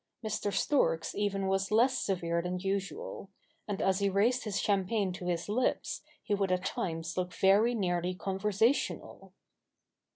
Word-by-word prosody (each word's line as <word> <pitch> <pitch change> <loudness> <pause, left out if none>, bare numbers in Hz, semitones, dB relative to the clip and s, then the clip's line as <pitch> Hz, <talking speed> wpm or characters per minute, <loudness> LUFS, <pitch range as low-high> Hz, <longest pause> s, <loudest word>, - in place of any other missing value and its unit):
Mr. 210 -1 -1
Storks 165 - +1
even 200 -1 -1
was 195 0 0
less 245 +5 +3
severe 170 -3 0
than 180 +1 -3
usual: 200 - -4 0.4
and 205 -2 -2
as 190 0 +2
he 200 0 +2
raised 230 +6 +2
his 205 -2 -1
champagne 200 -1 +1
to 180 - -7
his 170 -1 -1
lips, 235 +5 0 0.2
he 210 - -1
would 195 -2 +1
at 185 0 0
times 165 -1 -3
look 180 0 -1
very 210 +5 +4
nearly 180 -3 0
conversational. 210 +6 -1
195 Hz, 150 wpm, -31 LUFS, 180-210 Hz, 0.4 s, very